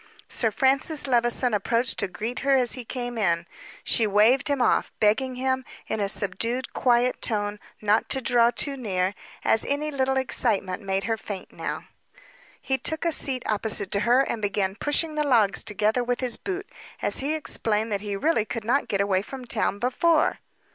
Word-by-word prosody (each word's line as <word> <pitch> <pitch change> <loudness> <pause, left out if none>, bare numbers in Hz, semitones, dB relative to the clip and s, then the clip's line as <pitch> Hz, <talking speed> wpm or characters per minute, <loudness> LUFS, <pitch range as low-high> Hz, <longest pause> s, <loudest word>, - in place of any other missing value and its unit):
Sir 225 - 0
Francis 270 +6 +1
Levison 240 -1 +1
approached 230 +4 +1
to 200 - +1
greet 220 +6 -5
her 275 0 +2
as 250 -3 +4
he 255 - -6
came 245 0 -5
in. 170 -4 +1 0.4
She 225 - +2
waved 215 +7 +4
him 285 -2 +1
off, 245 - +2
begging 250 +5 +2
him, 260 +1 -1 0.2
in - - -3
a 200 -1 0
subdued, 230 +6 -1
quiet 245 0 +2
tone, 205 -2 -1 0.2
not 210 +1 +2
to 265 - +2
draw 235 -1 +3
too 275 +4 0
near, 190 -6 -1 0.3
as 225 - +3
any 300 +2 -2
little 265 -1 0
excitement 210 -8 0
made 195 -1 -1
her 225 -1 -1
faint 200 -3 -8
now. - - -5 0.8
He 265 0 -1
took 315 +1 -1
a 335 - +2
seat 260 -5 0
opposite 210 -2 -1
to 200 - +1
her, 245 +5 +4
and 235 -4 -2
began 200 -2 0
pushing 295 +8 0
the 300 0 0
logs 230 -8 +4
together 215 +4 0
with 245 0 -1
his 250 -3 0
boot, 390 +1 -5 0.4
as - - +1
he 290 +4 -1
explained 220 -7 -1
that 200 -1 -1
he 205 -1 -4
really 260 +1 +1
could 225 0 -5
not 265 +5 +1
get 200 -1 0
away 195 -2 +1
from 255 +4 -8
town 220 -3 0
before. 305 +8 +2
235 Hz, 185 wpm, -25 LUFS, 210-265 Hz, 0.8 s, as